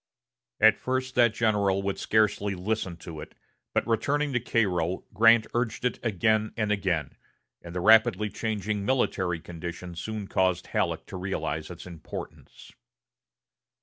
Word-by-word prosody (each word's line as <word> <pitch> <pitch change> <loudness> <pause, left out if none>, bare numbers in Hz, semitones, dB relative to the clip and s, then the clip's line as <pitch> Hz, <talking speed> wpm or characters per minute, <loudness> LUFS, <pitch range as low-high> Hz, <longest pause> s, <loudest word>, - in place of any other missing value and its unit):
At 110 0 +6
first 130 0 -2
that 120 -2 +4
general 100 -4 +1
would 100 0 -2
scarcely 105 -2 +1
listen 95 -2 -2
to 80 -3 -7
it; - - -11 0.4
but, - - 0
returning 140 +5 0
to 125 - +2
Cairo, 95 -7 0
Grant 115 +2 +6
urged 120 0 -1
it 125 - 0
again 110 0 +1
and 105 -2 0
again, 90 -8 -1 0.5
and 85 +1 -10
the 90 - -1
rapidly 110 0 +5
changing 105 -2 -2
military 95 -8 0
conditions 85 +1 -7
soon 110 -2 -5
caused 90 -2 +1
Halleck - - -1
to - - -7
realize 80 -5 -3
its 90 -1 -9
importance. 85 -3 -9
105 Hz, 140 wpm, -27 LUFS, 90-110 Hz, 0.5 s, At